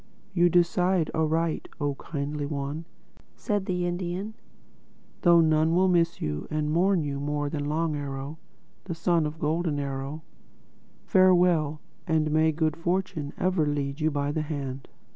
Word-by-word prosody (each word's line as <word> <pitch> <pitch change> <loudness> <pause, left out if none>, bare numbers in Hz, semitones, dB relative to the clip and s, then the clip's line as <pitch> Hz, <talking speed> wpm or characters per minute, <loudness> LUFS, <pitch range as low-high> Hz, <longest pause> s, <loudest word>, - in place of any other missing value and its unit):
"You 175 -1 +4
decide 175 0 +2
aright, 160 +1 0
oh 145 -1 0
Kindly 145 0 -4
One," 145 +2 -4 0.5
said 205 -2 -2
the 180 -1 0
Indian—"though 175 -1 -2
none 160 +1 +3
will 185 +1 +4
miss 170 -1 +2
and 150 - -2
mourn 180 +1 +3
you 140 -1 -3
more 145 0 -2
than 145 -2 -2
Long 160 0 0
Arrow, 140 +1 -5 0.5
the 175 -3 -4
son 165 -1 +2
of 150 +2 -7
Golden 160 0 0
Arrow—Farewell, 155 +3 0 0.3
and 155 -2 +1
may 155 +1 +4
good 155 0 0
fortune 175 -3 -2
ever 185 -4 +1
lead 145 0 -2
you 155 - +3
by 145 -1 -1
the 155 - -1
hand!" 140 -3 -5
155 Hz, 135 wpm, -27 LUFS, 145-175 Hz, 0.5 s, You